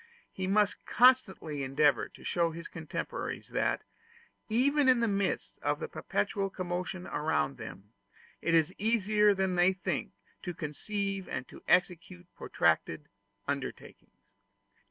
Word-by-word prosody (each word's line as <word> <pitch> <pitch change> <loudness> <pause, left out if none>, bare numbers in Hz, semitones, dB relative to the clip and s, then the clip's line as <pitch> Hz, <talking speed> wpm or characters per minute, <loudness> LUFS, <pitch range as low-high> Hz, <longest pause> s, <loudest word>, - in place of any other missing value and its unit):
He 190 0 -4
must 205 +1 +2
constantly 210 - +3
endeavor 140 +2 +2
to - - -16
show 170 -1 +1
his 165 +1 -7
contemporaries, 160 -2 -5
that, - - 0 0.7
even 270 +5 +3
in 250 -2 +5
the 230 - +2
midst 200 -2 -1
of - - 0
the - - -4
perpetual 195 -2 -2
commotion 180 0 -4
around 150 -2 -1
them, 100 +2 -10 0.5
it 170 - +2
is 165 +2 +3
easier 210 -1 +3
than 190 -1 0
they 180 +1 +4
think 190 - -3 0.3
to 180 -3 -5
conceive 195 +6 -3
and 125 0 -4
to - - -12
execute 180 0 +1
protracted 80 - 0 0.4
undertakings. 140 -1 -6
185 Hz, 130 wpm, -31 LUFS, 160-205 Hz, 0.7 s, in